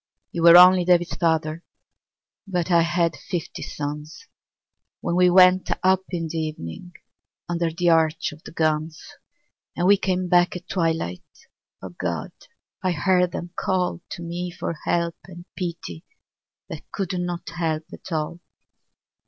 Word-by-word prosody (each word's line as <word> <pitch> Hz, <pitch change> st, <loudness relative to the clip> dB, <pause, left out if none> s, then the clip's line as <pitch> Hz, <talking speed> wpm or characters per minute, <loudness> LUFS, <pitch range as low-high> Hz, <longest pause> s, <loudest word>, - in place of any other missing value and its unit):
You 170 Hz, -, -3 dB
were, 170 Hz, +1 st, +9 dB
only 180 Hz, 0 st, +8 dB
David's 175 Hz, -1 st, +2 dB
father, 160 Hz, -1 st, 0 dB, 0.8 s
But 180 Hz, -2 st, -2 dB
I 170 Hz, -1 st, +5 dB
had 170 Hz, 0 st, +1 dB
fifty 175 Hz, -3 st, -5 dB
sons 150 Hz, -, -6 dB, 0.7 s
When 170 Hz, -, -2 dB
we 180 Hz, 0 st, +5 dB
went 185 Hz, 0 st, +5 dB
up 190 Hz, 0 st, +3 dB
in 170 Hz, -3 st, -3 dB
the 160 Hz, +1 st, -3 dB
evening 155 Hz, -, -6 dB, 0.5 s
Under 170 Hz, -1 st, -1 dB
the 170 Hz, +1 st, +1 dB
arch 160 Hz, 0 st, +2 dB
of 155 Hz, +2 st, -13 dB
the -, -, -10 dB
guns, 155 Hz, -1 st, -1 dB, 0.8 s
And 175 Hz, -, +1 dB
we 200 Hz, +2 st, +6 dB
came 185 Hz, -1 st, -1 dB
back 175 Hz, 0 st, +3 dB
at 180 Hz, 0 st, -8 dB
twilight 165 Hz, -, -1 dB, 0.4 s
— -, -, -63 dB
O -, -, -6 dB
God! -, -, -4 dB, 0.5 s
I 185 Hz, -2 st, 0 dB
heard 180 Hz, +2 st, +2 dB
them 175 Hz, +1 st, -6 dB
call 180 Hz, -2 st, -1 dB
To 170 Hz, -, -7 dB
me 175 Hz, +1 st, -4 dB
for 170 Hz, -1 st, -4 dB
help 170 Hz, -1 st, 0 dB
and 175 Hz, -2 st, -12 dB
pity 170 Hz, -, -5 dB, 0.6 s
That 160 Hz, -, -10 dB
could 190 Hz, -2 st, -3 dB
not 175 Hz, -1 st, -4 dB
help 165 Hz, -2 st, -2 dB
at -, -, -11 dB
all. 160 Hz, +2 st, -2 dB
170 Hz, 150 wpm, -23 LUFS, 160-180 Hz, 0.8 s, were